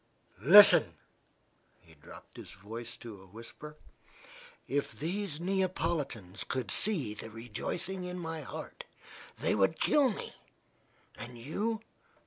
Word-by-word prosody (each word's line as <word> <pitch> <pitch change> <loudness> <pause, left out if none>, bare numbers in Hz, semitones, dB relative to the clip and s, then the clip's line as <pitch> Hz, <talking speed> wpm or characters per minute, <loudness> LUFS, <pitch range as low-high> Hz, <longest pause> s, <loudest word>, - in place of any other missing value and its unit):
Listen," 200 - +9 0.8
he 80 - -21
dropped 75 - -15
his - - -10
voice 115 +4 -7
to 110 -5 -10
a 95 - -16
whisper: 115 +9 -11 0.9
"if 140 +1 -1
these 170 0 -3
Neapolitans 170 - -2
could 130 -1 -3
see 160 - 0
the 110 - -8
rejoicing 145 - -5
in 180 0 -5
my 165 -2 -5
heart, 140 - -8 0.5
they - - +1
would 105 +10 +2
kill 285 -3 +4
me. 210 - -6 0.9
And 120 +2 -8
you? 205 - -2
150 Hz, 115 wpm, -31 LUFS, 115-185 Hz, 0.9 s, Listen